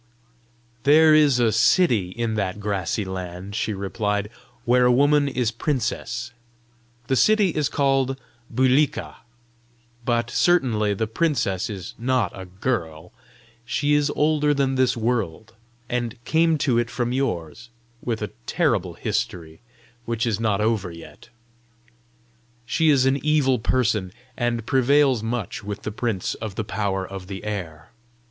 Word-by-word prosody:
"There 155 +4 +6
is 145 -5 +5
a 115 -2 +3
city 115 - +3
in 115 +3 -3
that 100 -2 -2
grassy 100 0 -2
land," 95 +1 -6
she 110 0 -1
replied, 105 +1 -2 0.3
"where 125 +1 +4
a - - +5
woman 145 +3 +4
is 125 -4 0
princess. 120 -1 -2 0.7
The 130 - 0
city 215 - +4
is 150 -4 -1
called 135 -2 +1 0.3
Bulika. 130 +4 +1 0.9
But 120 0 0
certainly 115 - +2
the 110 - -1
princess 110 - 0
is 95 -4 -7
not 125 -5 +1
a 95 - -8
girl! 90 -5 -3 0.5
She 145 +5 0
is 145 0 +3
older 150 -1 +2
than 135 -1 +1
this 130 -2 +2
world, 110 -3 -2 0.3
and 120 -1 -3
came 160 0 +3
to 120 -5 +3
it 120 -1 -1
from 120 0 -2
yours 120 - -3 0.3
with 115 -3 -3
a 105 - -4 0.2
terrible - - 0
history, 80 -2 -3 0.4
which 115 0 -1
is 110 -3 -1
not 105 -3 +1
over 105 -4 0
yet. 85 +8 -13 1.4
She 160 +7 +2
is 135 -3 +4
an 135 +1 +1
evil 145 -5 +2
person, 110 -5 0 0.2
and 120 -2 -1
prevails 135 -1 +3
much 115 -3 -4
with 105 0 -6
the 105 - -3
Prince 110 -3 -2
of 110 -4 -7
the 110 - -2
Power 95 -1 -2
of 95 -1 -8
the 95 -1 -7
Air. 85 -7 -6
115 Hz, 140 wpm, -23 LUFS, 100-135 Hz, 1.4 s, There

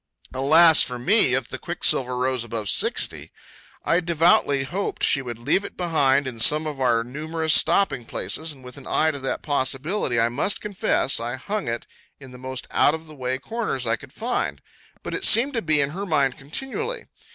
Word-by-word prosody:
Alas 155 +5 +6
for 125 - -1
me 130 - +3
if 130 -2 -1
the - - -7
quicksilver 130 -7 0
rose 130 -1 -1
above 115 -3 -4
60! - - 0 0.5
I 170 - +3
devoutly 165 -5 +3
hoped 185 +9 -4
she 135 - +4
would 120 -3 -7
leave 120 - 0
it - - -9
behind 145 -6 +2
in 125 -3 -6
some 150 +6 +4
of 145 -3 -5
our 120 -3 +2
numerous 155 +5 -2
stopping 140 -12 +2
places, 160 +7 -3
and 135 -3 -12
with 125 +2 -11
an 140 - -10
eye 160 0 +2
to 140 - -7
that 135 - -3
possibility, 140 - -1
I 115 +1 +2
must 145 +11 0
confess, 195 -9 -1
I 120 +2 -3
hung 205 +9 -4
it 115 0 -3 0.3
in 135 -2 -13
the 125 - -12
most 130 0 -6
out 150 - +3
of 160 0 -10
the 155 - -13
way 130 -2 -3
corners 140 - -3
I 115 0 +1
could 130 +3 -14
find; 230 - -2 0.4
but - - -6
it 400 - -3
seemed 255 - +5
to 230 - -1
be 155 -5 +1
on 140 - -3
her 195 +5 -5
mind 140 -6 +1
continually. 270 - -5
140 Hz, 195 wpm, -23 LUFS, 130-170 Hz, 0.5 s, Alas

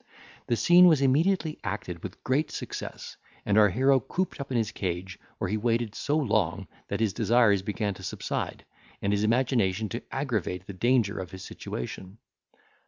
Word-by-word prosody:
The 120 - +2
scene 175 +8 +7
was 160 -5 +5
immediately 155 +4 +2
acted 95 -5 -4
with 100 +1 -8
great 140 +4 +1
success, - - -6 0.3
and 100 - +2
our 105 -1 +6
hero 135 +7 +3
cooped 180 +4 -3
up 140 - -6
in 125 - +1
his 110 -2 0
cage, 95 -2 -4 0.2
where - - -2
he 105 +4 -1
waited 115 -1 0
so 145 +6 0
long, 110 - 0 0.2
that - - -3
his 110 -4 +1
desires 110 -4 +3
began 105 +1 -2
to 95 - -13
subside, 95 - -4 0.3
and 100 +1 0
his 100 0 +1
imagination 110 -3 +1
to 120 - -4
aggravate 110 - -2
the 100 - -7
danger 115 0 +1
of 95 - -5
his 95 0 -9
situation. 95 - -7
110 Hz, 170 wpm, -27 LUFS, 100-130 Hz, 0.3 s, scene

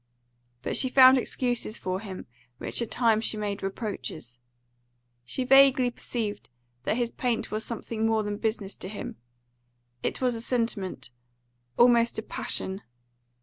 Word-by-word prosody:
But - - -2
she 260 - +3
found 260 0 +8
excuses 245 -3 -1
for 185 0 -3
him, 195 -3 -8 0.3
which - - -3
at 235 - -2
times 225 -3 +2
she 220 - -1
made 205 -1 -3
reproaches. 195 - -5 0.9
She 260 - -2
vaguely 265 -1 +6
perceived 220 - -4 0.4
that 220 - +1
his 240 -1 0
paint 245 -3 -1
was 215 +1 -2
something 225 -1 -2
more 220 -1 +2
than 205 0 -3
business 215 -3 -2
to 185 - -7
him; 205 - -7 0.8
it - - -2
was 250 -2 +1
a 225 - -5
sentiment, 210 - -2 0.7
almost 235 -1 +5
a 220 - -2
passion. 190 -2 -4
225 Hz, 145 wpm, -27 LUFS, 205-245 Hz, 0.9 s, found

